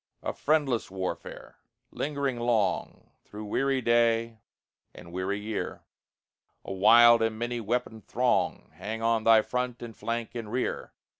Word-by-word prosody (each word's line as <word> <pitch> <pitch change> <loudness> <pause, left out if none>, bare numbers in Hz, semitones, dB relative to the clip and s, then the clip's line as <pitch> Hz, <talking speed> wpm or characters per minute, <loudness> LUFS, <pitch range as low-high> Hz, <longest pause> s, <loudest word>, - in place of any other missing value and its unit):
A - - -2
friendless 145 -6 0
warfare! 95 -1 -6 0.3
lingering 140 -4 -2
long 120 -3 -1
Through 105 +1 -9
weary 135 +5 0
day 115 -1 +2 0.6
and 85 - -12
weary 95 +3 -2
year; 105 0 -5 0.8
A - - -5
wild 115 +4 +7
and 110 -1 0
many 120 +1 -3
weaponed 110 -1 -3
throng 125 0 0
Hang 110 +2 -6
on 115 -1 +1
thy 110 -1 +6
front, 125 -1 -3
and 115 -2 -8
flank, 115 0 -4
and 115 -3 -6
rear. 125 +1 -3
115 Hz, 135 wpm, -28 LUFS, 110-120 Hz, 0.8 s, wild